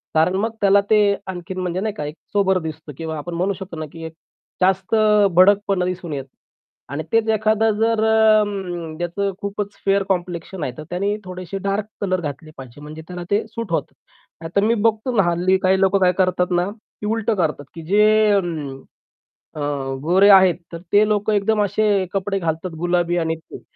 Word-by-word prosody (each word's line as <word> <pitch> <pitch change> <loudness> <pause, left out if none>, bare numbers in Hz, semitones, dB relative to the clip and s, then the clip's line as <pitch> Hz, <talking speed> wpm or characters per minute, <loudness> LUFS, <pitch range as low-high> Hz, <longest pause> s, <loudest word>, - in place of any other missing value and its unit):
कारण 160 +4 +3
मग 225 +1 -1
त्याला 200 0 +5
ते 215 - +5 0.3
आणखीन 185 0 -6
म्हणजे 180 0 -2
नाही 215 +1 -2
का, 150 - -5
एक 150 +1 -6 0.2
सोबर 190 -2 +2
दिसतं 155 -2 -7
किंवा 160 -1 -4
आपण 170 +4 -6
म्हणू 185 +4 0
शकतो 190 -3 -9
ना, 155 - -4
की 165 - -10
एक 160 - -8 0.5
जास्त 190 +3 +2 0.4
भडकपणा 195 0 +4
दिसून 180 -3 -4
येतं. 135 -1 -6 0.6
आणि 155 +2 -3
तेच 225 0 +2
एखादं 220 +1 +2
जर 225 0 +1
अ, 220 -1 +5 0.6
त्याचं 185 +3 -2
खूपच 200 0 -4
फेअर 195 0 +3
कॉम्प्लेक्शन 175 -1 -3
आहे, 130 - -2
तर 155 - -7
त्याने 200 +4 -1
थोडेसे 185 0 -6
डार्क 200 +1 -1 0.2
कलर 185 -2 0
घातले 155 0 -6
पाहिजेत, 130 +1 -11
म्हणजे 155 +1 -9
त्याला 180 -1 -6
ते 205 +2 +2
सूट 230 -3 -6
होतं. 160 -3 -2 0.5
नाहीतर 170 +5 -1
मी 230 - +3
बघतो 225 +3 -1
ना, 200 - +4
हल्ली 180 +2 +2
काही 190 +1 +3
लोक 195 0 +3
काय 180 -1 +5
करतात 185 -1 +1
ना, 175 +2 +1 0.3
की - - -4
उलटं 225 0 0
करतात, 155 -6 -1
की 165 - -7
जे 205 +5 +4 0.3
अं, 165 -8 -1 0.8
अ, 155 - -6 0.4
गोरे 185 +6 +4
आहेत, 190 -3 +7 0.2
तर 170 - -5
ते 210 +1 +5
लोक 210 0 0
एकदम 210 +1 +2
असे 205 -1 +1
कपडे 195 0 -1
घालतात, 165 0 -3
गुलाबी 175 0 0
आणि 160 -1 0
ते. 160 - -13
185 Hz, 185 wpm, -21 LUFS, 170-205 Hz, 0.8 s, आहेत